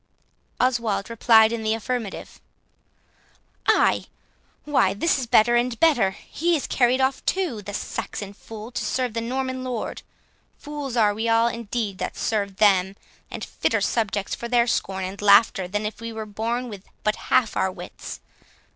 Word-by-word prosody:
Oswald 235 -5 0
replied 225 -1 +5
in 235 -1 -2
the 220 0 +1
affirmative. 225 -2 -5 1.3
"Ay? - - +3 0.6
why 260 -10 +2
this 290 +7 +1
is 250 - -3
better 240 0 +5
and 240 -1 0
better! 275 -12 +4 0.2
he 340 +2 +1
is 295 - -2
carried 250 0 +2
off 265 0 +1
too, 345 - -1
the 205 - -7
Saxon 200 0 -5
fool, 220 +2 -10
to - - -3
serve 250 -3 -1
the 230 - -2
Norman 260 +2 -3
lord. 250 -4 -4 0.6
Fools 290 -4 -5
are 210 -2 +4
we 225 +2 -2
all 230 +1 +4
indeed 230 -4 -3
that - - -4
serve 200 -3 -1
them, 195 -2 +3 0.3
and - - -6
fitter - - 0
subjects 205 -3 -1
for 235 - -4
their 240 0 +3
scorn 190 -5 -1
and 190 +2 -6
laughter, 200 -2 +5
than 205 +3 -2
if 210 +1 -5
we 230 0 -5
were 220 -1 -5
born 230 +4 -3
with 205 -4 -10 0.2
but 215 0 +1
half 235 -4 +3
our 190 - +1
wits. - - -9
230 Hz, 165 wpm, -24 LUFS, 205-250 Hz, 1.3 s, replied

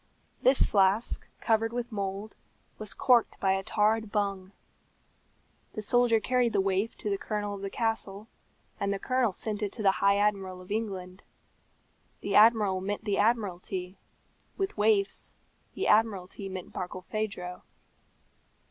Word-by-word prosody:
This 260 +1 +4
flask, 200 +3 +2
covered 225 0 +2
with 240 0 -4
mould, 200 0 -4 0.4
was 215 -2 -5
corked 250 -4 +3
by 190 - +2
a 190 0 +1
tarred 215 +2 +1
bung. 195 -2 -1 1.2
The 215 - -5
soldier 240 +1 +3
carried 250 0 +1
the 200 - +2
waif 195 +3 0
to 210 - -4
the 200 - -1
colonel 205 -1 -3
of 200 - -7
the 195 - -3
castle, 220 -2 -2 0.5
and 200 - 0
the 200 - 0
colonel 255 +1 +1
sent 210 +3 -4
it 205 -2 -1
to 220 - -5
the 195 - +6
High 200 0 +4
Admiral 195 -3 0
of 185 +2 -12
England. 195 -4 -4 1.0
The 200 - -3
Admiral 210 -3 +5
meant 205 +3 -3
the 205 -2 0
Admiralty; 190 -4 -1 0.6
with 390 -1 -2
waifs, 205 -2 +1 0.4
the - - -1
Admiralty 200 -3 +1
meant 185 -1 -7
Barkilphedro. 185 0 -4
205 Hz, 140 wpm, -29 LUFS, 195-220 Hz, 1.2 s, the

